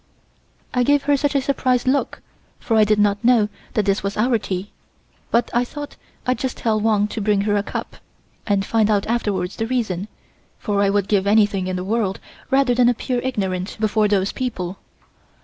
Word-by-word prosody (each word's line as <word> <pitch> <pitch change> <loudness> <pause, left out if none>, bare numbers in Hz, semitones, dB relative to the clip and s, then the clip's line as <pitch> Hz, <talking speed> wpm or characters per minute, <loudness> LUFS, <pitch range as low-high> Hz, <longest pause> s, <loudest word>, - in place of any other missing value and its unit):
I 250 - +2
gave 285 +3 +3
her 285 0 +3
such 285 +1 0
a 275 - +3
surprised 255 -2 +1
look, 275 +2 0 0.4
for 225 - -1
I 215 - +6
did 210 0 +2
not 205 0 +2
know 230 -3 +4 0.3
that 215 - +1
this 195 0 +1
was 200 0 -3
our 230 +1 +2
tea, 190 0 -4 0.6
but 235 +1 +1
I 240 - +3
thought 290 +3 -8 0.3
I'd 255 0 0
just 260 -2 -3
tell 220 -2 0
Wang 210 -1 +2
to 220 - -4
bring 205 -1 +2
her 205 0 +1
a 205 - +2
cup, - - -6 0.5
and 200 -2 +1
find 220 -1 +2
out 205 -2 +2
afterwards 205 -6 -1
the 225 - -2
reason, 215 -7 -2 0.5
for 205 -2 -1
I 200 - +3
would 200 -1 +1
give 200 -2 +1
anything 205 -3 +3
in 185 - -2
the 180 - -3
world 200 -1 -1 0.3
rather 270 -2 +3
than 245 0 +4
appear 245 +1 -1
ignorant 195 -7 -3
before 215 0 +2
those 195 -1 +1
people. 190 -8 -4
215 Hz, 195 wpm, -21 LUFS, 200-245 Hz, 0.6 s, I